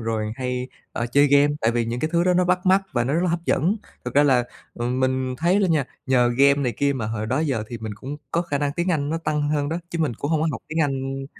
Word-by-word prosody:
rồi 110 -1 -2
hay, 125 0 -3 0.2
ơ, 120 - -2
chơi 145 +1 +5
game. 145 +1 +4
Tại 115 - +2
vì 120 -1 0
những 120 +2 -3
cái 155 - -1
thứ 170 +1 +3
đó 180 -1 +3
nó 180 - +3
bắt 180 +1 0
mắt 190 +1 +5
và 120 -1 +1
nó 135 +5 0
rất 170 - +2
là 175 - +1
hấp 170 0 -2
dẫn. 180 +9 +1 0.3
Thực 125 +1 -5
ra 145 - +6
là, 130 -4 +3 0.3
ừm, 125 +2 -2
mình 130 0 0
thấy 175 +6 +2
đó 195 - +3
nha, 155 -6 +2 0.2
nhờ 125 -2 +3
game 140 +1 +6
này 140 -4 -1
kia 140 0 +2
mà 115 -5 -3
hồi 110 0 -3
đó 130 +6 0
giờ 135 -9 0
thì 120 - -6
mình 110 -2 -6
cũng 135 +7 -7
có 170 - +1
khả 145 -5 -2
năng 145 0 -1
tiếng 175 +4 -1
Anh 145 -3 0
nó 165 - -1
tăng 150 -2 -1
hơn 145 -1 0
đó, 165 +2 -2
chứ 170 - -3
mình 150 -8 0
cũng 145 +7 -4
hông 155 -2 +2
có - - +2
học - - -5
tiếng 160 +1 -1
Anh, 135 -1 -2
140 Hz, 295 wpm, -23 LUFS, 125-160 Hz, 0.3 s, ra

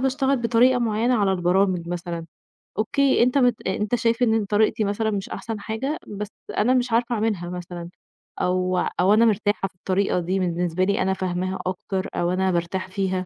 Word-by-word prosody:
باشتغل 270 +1 +1
بطريقة 240 +1 +3
معيّنة 235 +2 +1
على 200 -3 +2
البرامج 180 -1 +1
مثلًا، 170 -1 -4 0.5
أوكي، 265 +4 +3
أنت 250 +3 +2
مت 245 -6 +2
أنت 210 +4 0
شايف 230 +1 +1
إن 220 -2 +2
طريقتي 215 +2 +2
مثلًا 210 +2 0
مش 200 -2 -3
أحسن 225 -2 -5
حاجة، 245 +9 -3
بس 210 0 -5 0.3
أنا 245 +5 +3
مش 250 -1 +1
عارفة 235 +1 +1
أعملها 210 -5 -1
مثلًا، 175 -1 -7 0.5
أو 185 0 +1 0.2
أو 190 +3 +5
أنا 225 +2 +5
مرتاحة 205 -2 +1
في 190 - -22
الطريقة 190 +1 0
دي 180 +2 -1
بالنسبة 175 0 0
لي 200 0 +1
أنا 190 +1 +1
فاهماها 185 0 -2
أكتر، 190 +1 -3
أو 175 +1 0
أنا 190 0 +1
بارتاح 175 +2 -2
فيها 185 -1 -2
200 Hz, 175 wpm, -23 LUFS, 185-230 Hz, 0.5 s, أو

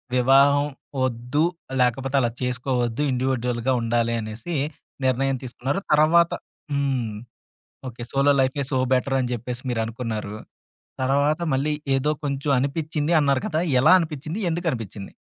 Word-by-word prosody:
వివాహం 140 +3 +5 0.4
వద్దు, 125 +5 0 0.4
లేకపోతే 135 +2 +1
అలా 120 -1 +1
చేసుకోవద్దు. 125 0 -1
ఇండివిడ్యుయల్‌గా 125 -1 0
ఉండాలి 115 0 +1
అనేసి, 115 +10 -5 0.5
నిర్ణయం 135 +1 +1
తీసుకున్నారు. 130 +5 -3
తరువాత 165 +3 +5 0.4
హ్మ్. 135 -6 0 0.8
ఓకే. 120 0 -11
సోలో 140 +1 +3
లైఫే 135 +2 0
సో 130 - +1 0.2
బెటరని 130 -1 +1
జెప్పేసి 120 +2 -5
మీరనుకున్నారు. 110 -2 -3 0.7
తరువాత 140 +4 +2
మళ్ళీ 145 +3 +1 0.2
ఏదో 145 +3 +1
కొంచెం 140 0 -2
అనిపిచ్చింది, 150 +3 -1
అన్నారు 140 -3 +2
కదా! 155 - 0 0.2
ఎలా 150 +7 +6
అనిపిచ్చింది? 155 +3 -4
ఎందుకనిపిచ్చింది? 120 - -3
130 Hz, 115 wpm, -24 LUFS, 120-145 Hz, 0.8 s, ఎలా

